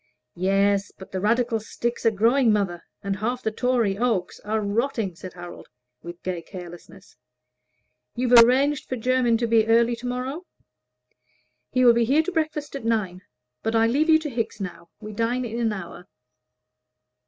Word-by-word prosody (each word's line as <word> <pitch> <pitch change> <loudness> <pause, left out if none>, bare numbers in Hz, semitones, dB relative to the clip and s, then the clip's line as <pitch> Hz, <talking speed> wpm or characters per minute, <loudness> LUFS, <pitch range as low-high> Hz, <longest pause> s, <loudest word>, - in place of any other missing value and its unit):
"Yes, 195 +2 +1
but 190 +1 -12
the 190 - -3
Radical 230 +3 +1
sticks 235 +2 -3
are - - +8
growing, 230 +4 +3
mother, 195 -5 0 0.2
and 200 0 -2
half 245 +5 -2
the 220 - 0
Tory 230 -4 0
oaks 225 -7 -1
are 215 +1 -2
rotting," 215 -1 -1
said 185 +2 -9
Harold, 175 -1 -10 0.3
with 170 +1 -10
gay 180 -2 -3
carelessness. 180 0 -12 1.0
"You've 245 0 -1
arranged 270 +4 +1
for 255 - -1
Jermyn 245 0 +2
to 235 - -1
be 225 -1 +3
early 235 +1 +3
to 245 +2 -6
morrow?" 260 +8 -4 1.2
"He 255 0 +2
will 240 - +8
be 235 0 +2
here 285 +7 +3
to 370 - -3
breakfast 310 -4 -2
at 275 - -6
nine. 210 -6 -1 0.4
But 225 +1 -1
I 225 0 +4
leave 285 +8 +1
you 315 - +7
to 315 -1 -5
Hickes 230 -3 -3
now; 180 -3 -7
we 215 -1 -8
dine 235 +4 -1
in 230 0 -4
an 230 -2 +1
hour." 180 -2 -8
225 Hz, 170 wpm, -24 LUFS, 195-250 Hz, 1.2 s, are